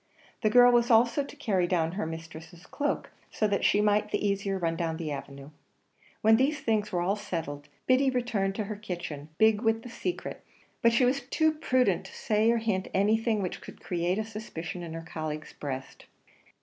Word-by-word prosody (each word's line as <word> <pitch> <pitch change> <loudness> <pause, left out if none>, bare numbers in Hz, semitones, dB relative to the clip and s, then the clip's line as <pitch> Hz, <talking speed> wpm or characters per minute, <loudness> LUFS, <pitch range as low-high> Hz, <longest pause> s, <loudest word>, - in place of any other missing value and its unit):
The 215 - +3
girl 245 +2 +7
was 240 0 +3
also 235 +4 +4
to 280 - -11
carry 200 -11 0
down 165 -2 +1
her 185 -2 -3
mistress' 160 +1 -9
cloak 290 0 -2 0.2
so 215 - 0
that 200 -1 0
she 205 - +4
might 210 0 +2
the 210 - 0
easier 200 -1 -1
run 165 -2 -1
down 165 -1 -2
the 160 -3 -4
avenue. 140 0 -7 0.7
When 220 +1 +6
these 280 +4 +1
things 210 -2 0
were 175 - 0
all 195 +3 +1
settled, 160 -8 -5 0.2
Biddy 260 +1 +4
returned 225 -6 -1
to 215 - -1
the 210 0 -5
kitchen, 175 -7 -6
big 220 -1 +4
with 225 -1 +1
the 245 - -8
secret; 350 +9 -5 0.4
but 235 - +5
she 235 +2 +4
was 265 +3 +1
too 315 +2 +2
prudent 255 - +1
to - - -13
say 215 0 +2
or 235 - +3
hint 215 -5 -1
anything 215 +1 +2
which 180 - -4
could - - -11
create 175 +1 -1
a 220 - -1
suspicion 195 -6 -6
in 165 -2 -6
her 165 0 -6
colleague's 155 -1 -5
breast. 130 -2 -7
205 Hz, 195 wpm, -28 LUFS, 170-230 Hz, 0.7 s, girl